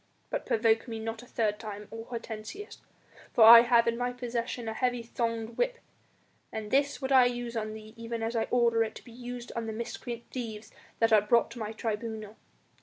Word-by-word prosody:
But - - -3
provoke 225 +1 +2
me 225 -1 -5
not 225 +1 -4
a 245 - -14
third 210 -3 -1
time, 210 -2 -7
O 225 0 -7
Hortensius, 235 - -7 0.5
for 230 - +7
I 230 +1 +12
have 235 -1 +4
in 235 0 0
my 245 0 0
possession 245 -1 -4
a 220 - -2
heavy 245 0 0
thonged 230 -1 -3
whip, - - 0 0.7
and 215 -1 -5
this 285 +1 +1
would 265 - -2
I 260 -2 +7
use 245 -1 -2
on 215 -1 -3
thee 215 0 -11
even 230 0 -4
as 225 +1 -2
I 225 - +1
order 235 -2 +3
it 220 - -5
to - - -10
be 235 - -13
used 245 0 -7
on 230 -1 -3
the 220 - -3
miscreant 235 +1 -5
thieves 220 -4 -6 0.3
that 225 -1 +3
are 215 - +7
brought 230 +3 +3
to 240 - -8
my 215 -1 -3
tribunal. 220 -1 -4
230 Hz, 205 wpm, -29 LUFS, 220-245 Hz, 0.7 s, I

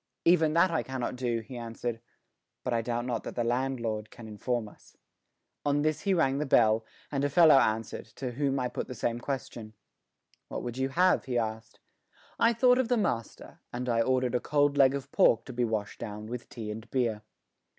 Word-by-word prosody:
"Even 160 -3 +4
that 170 +1 +4
I 165 - +1
cannot 130 -2 -4
do," 120 -2 -1
he 125 +3 -10
answered; 115 0 -5 0.6
"but 125 - -1
I 115 - +1
doubt 120 +1 -2
not 120 -3 -2
that - - -7
the 120 - 0
landlord 120 -3 -1
can 115 -2 -11
inform 110 +2 -2
us." - - -18 0.7
On 145 0 +1
this 155 0 0
he 195 - +1
rang 140 -5 +2
the 150 - -1
bell, 110 -3 +4 0.3
and 140 -1 -1
a 145 - +2
fellow 155 -1 +7
answered, 110 -2 -1
to 130 -2 -4
whom 135 +1 0
I 125 - 0
put 125 - -5
the 125 - -7
same 120 +1 -1
question. 120 -4 -5 0.7
"What - - -5
would 120 +1 -5
you 135 0 0
have?" 180 +7 +3
he 125 -2 -1
asked. 110 -1 -4 0.6
I 230 - +5
thought 250 +2 +4
of 260 - +1
the 245 0 +2
master, 115 - -3
and 125 +1 -4
I 115 -1 +2
ordered 130 0 +1
a 125 - +2
cold 145 0 +2
leg 135 -1 +5
of 140 -2 -6
pork 115 0 +4
to 130 - -8
be 120 +1 0
washed 110 -2 -3
down 105 0 -6
with 120 +2 -7
tea 110 -3 -6
and 110 +2 -8
beer. 115 -5 0
125 Hz, 205 wpm, -29 LUFS, 115-140 Hz, 0.7 s, fellow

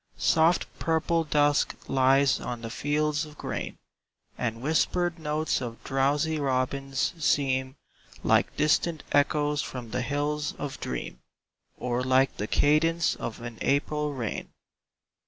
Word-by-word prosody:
Soft 160 +2 +3
purple 165 +1 +1
dusk 145 -1 +2
lies 135 +1 +3
on 120 -1 -5
the 115 - -5
fields 150 +3 0
of 150 -1 -11
grain - - -4 0.6
And 115 -2 -3
whispered 175 +3 +1
notes 155 -1 -1
of 115 -2 -6
drowsy 145 +4 +1
robins 135 0 -1
seem 130 -2 +1 0.5
Like - - +2
distant 155 +1 +2
echoes 145 0 +2
from 120 -3 -7
the 125 - -1
hills 145 +3 -1
of 145 - -6
dream, - - -5 0.6
Or 125 0 -1
like 130 +1 +3
the 105 - -3
cadence 165 +5 +3
of 115 - -6
an 120 -2 -7
April 150 +1 0
rain. 115 -5 -4
145 Hz, 125 wpm, -27 LUFS, 130-150 Hz, 0.6 s, Soft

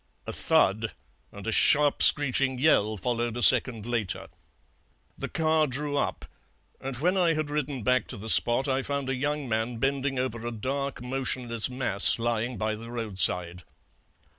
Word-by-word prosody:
A - - -7
thud 110 +3 0 0.4
and 100 0 -12
a 115 - -3
sharp 145 +5 +2
screeching 135 -2 +4
yell 110 -7 +1
followed 120 +3 -4
a 120 - +1
second 115 -5 +5
later. 115 -5 -4 0.9
The - - -7
car 160 -1 0
drew 145 +2 -5
up, 140 - -3 0.5
and 135 -1 -7
when 180 +8 -1
I 170 -3 +1
had 155 -1 -4
ridden 145 -4 -4
back 125 -1 0
to - - -9
the 105 +3 -10
spot 120 +4 +4
I 135 0 -1
found 140 -1 -4
a - - -2
young 145 +1 -4
man 115 +1 -3
bending 135 +2 -3
over 120 -3 -4
a 120 - -5
dark 135 +4 -5
motionless 125 -2 -2
mass 125 -6 +5
lying 120 +1 -3
by 110 0 -3
the 115 +2 -10
roadside. 95 -6 0
125 Hz, 165 wpm, -25 LUFS, 115-140 Hz, 0.9 s, second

